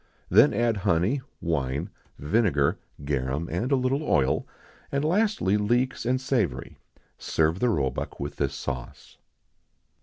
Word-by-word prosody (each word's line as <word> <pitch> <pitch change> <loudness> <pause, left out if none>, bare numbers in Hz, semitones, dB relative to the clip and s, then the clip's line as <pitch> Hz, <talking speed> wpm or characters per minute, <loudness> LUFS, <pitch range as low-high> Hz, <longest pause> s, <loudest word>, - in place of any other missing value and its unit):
Then - - +7
add 115 0 +1
honey, 100 +7 +1 0.2
wine, 75 +1 -2 0.3
vinegar, 75 -4 +1 0.3
garum, 70 +3 -1
and 95 - -1
a - - +5
little 130 +2 0
oil; 70 - +1 0.4
and, 140 +2 0
lastly, 180 - +2
leeks 120 +4 0
and 130 +1 +2
savory. 115 - -2 0.4
Serve 80 +3 +1
the 125 - +2
roebuck 70 - -2
with 70 +1 -5
this 70 -1 -1
sauce. 65 -2 -7
95 Hz, 125 wpm, -26 LUFS, -, 0.4 s, Then